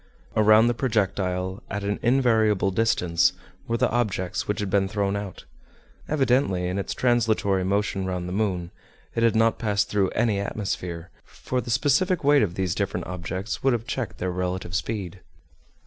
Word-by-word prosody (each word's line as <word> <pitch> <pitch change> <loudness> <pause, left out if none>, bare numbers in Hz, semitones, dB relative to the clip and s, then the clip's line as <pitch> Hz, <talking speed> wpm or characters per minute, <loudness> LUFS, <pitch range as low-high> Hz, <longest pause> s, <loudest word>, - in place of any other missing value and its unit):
Around 110 +1 +6
the 120 - +2
projectile, 95 -6 -1
at 105 0 -3
an 100 +1 -2
invariable 110 -6 +3
distance, 90 -4 +2 0.3
were 115 - 0
the - - +1
objects 95 -5 -1
which 105 - -1
had 100 -2 -3
been 100 0 +2
thrown 100 0 -1
out. 100 -3 -6 0.6
Evidently, 130 -10 +1
in 90 +2 -2
its 100 - -3
translatory 110 -6 +2
motion 95 0 0
round 90 -1 -3
the 90 - -4
moon, 95 -4 -1 0.4
it 115 - -1
had 115 -1 +3
not 115 0 +3
passed 105 -3 0
through 100 -2 +1
any 105 -4 +1
atmosphere, 90 -4 -4
for 125 0 -4
the 120 - -9
specific 145 - +2
weight 145 0 +5
of 90 -4 0
these 95 -3 -1
different 95 -2 -2
objects 90 +3 -4
would 135 -1 +3
have 115 -1 -2
checked 130 -3 -4
their 90 0 -2
relative 90 0 -3
speed. 100 -3 -3
100 Hz, 165 wpm, -25 LUFS, 95-115 Hz, 0.6 s, Around